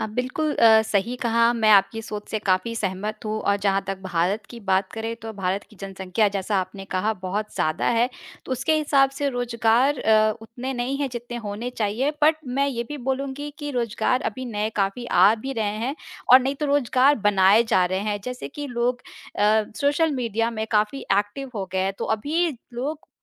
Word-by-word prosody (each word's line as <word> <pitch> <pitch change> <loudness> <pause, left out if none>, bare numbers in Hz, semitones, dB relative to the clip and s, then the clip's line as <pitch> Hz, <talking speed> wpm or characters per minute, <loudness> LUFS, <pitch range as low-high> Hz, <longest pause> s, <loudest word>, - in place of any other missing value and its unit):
आप 215 - -3
बिल्कुल 255 +7 -1
अ, 220 -1 +6
सही 220 +2 0
कहा, 235 0 +3
मैं 220 -2 +2
आपकी 200 +2 +4
सोच 210 -1 -7
से 215 - -1
काफ़ी 195 +2 0
सहमत 210 +2 -3
हूँ 215 0 -2
और 200 0 +1
जहाँ 195 0 +2
तक 195 0 -3
भारत 190 +3 -1
की 235 - -9
बात 190 -2 0
करें, 225 +1 -4
तो 225 -1 -8
भारत 195 -1 -2
की 215 - -17
जनसँख्या 195 +1 0
जैसा 195 +1 -1
आपने 195 +1 -7
कहा 210 +4 +1
बहुत 205 +3 -3
ज़्यादा 155 0 0
है, 235 +1 +3 0.4
तो - - -4
उसके 265 +5 +1
हिसाब 280 -3 +3
से 285 -1 +1
रोज़गार 245 +2 +1
अ, 215 -1 +4
उतने 245 +4 -6
नहीं 245 +2 -2
है 280 - -1
जितने 240 0 -6
होने 215 +5 -4
चाहिए। 230 +5 -1
बट 310 +1 +5
मैं 270 +3 0
ये 235 -3 -3
भी 295 -1 -5
बोलूँगी 275 +2 -3
कि 290 -1 -4
रोज़गार 245 +1 0
अभी 255 +4 -7
नए 210 +1 -1
काफ़ी 200 +5 -1
आ 195 +3 +5
भी 270 - -3
रहे 215 -4 -2
हैं 270 - -2 0.4
और 255 - +10
नहीं 270 +2 -1
तो 300 - 0
रोज़गार 280 0 +3
बनाए 200 +3 +5
जा 185 -5 +3
रहे 185 +1 -1
हैं, 205 0 -2
जैसे 250 0 -5
कि 290 +1 -6
लोग 245 -1 -1 0.4
अ, 215 +1 +4 0.2
सोशल 290 +3 +2
मीडिया 230 -3 -1
में 220 -1 -3
काफ़ी 215 +5 +1 0.2
एक्टिव 210 +7 -4
हो 195 -2 -3
गए 190 - 0
हैं, 190 +1 0
तो - - -2
अभी 320 +9 0 0.2
लोग 290 +6 -4
225 Hz, 200 wpm, -24 LUFS, 205-255 Hz, 0.4 s, और